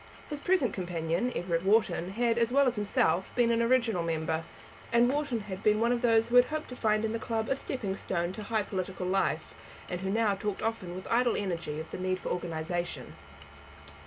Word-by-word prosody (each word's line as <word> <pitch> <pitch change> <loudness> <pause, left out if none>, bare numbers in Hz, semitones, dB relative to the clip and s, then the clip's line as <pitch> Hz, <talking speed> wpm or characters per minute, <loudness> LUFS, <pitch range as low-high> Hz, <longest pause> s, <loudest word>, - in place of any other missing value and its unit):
His 295 - -3
present 290 - +2
companion, 175 +4 -1
Everett 170 -1 -1
Wharton, 190 -3 +2
had, 235 +1 +1
as 230 0 +2
well 280 +2 +5
as 250 -1 +1
himself, 200 -3 +1
been 240 -1 +3
an 230 0 +2
original 230 -5 +2
member; 160 -1 -1 0.5
and 235 +1 +5
Wharton 275 -4 -1
had 195 -2 -7
been 210 -1 +3
one 235 +1 +2
of 245 -1 +1
those 230 -1 +3
who 245 - +4
had 245 - +8
hoped 310 +2 -4
to 250 - -7
find 215 -2 +1
in 220 - -1
the 230 - -2
club 225 -1 -2
a 270 - +2
stepping 230 -8 -3
stone 175 -2 -2
to 215 - -7
high 215 0 0
political 185 -2 -4
life, 195 +1 0 0.3
and 180 0 -4
who 190 - -2
now 215 0 +2
talked 200 0 -3
often 220 -6 -2
with 185 - -7
idle 240 0 +3
energy 170 -6 -3
of 160 - -8
the - - -5
need 185 0 0
of - - -16
organization. 175 0 -3
210 Hz, 210 wpm, -30 LUFS, 180-235 Hz, 0.5 s, had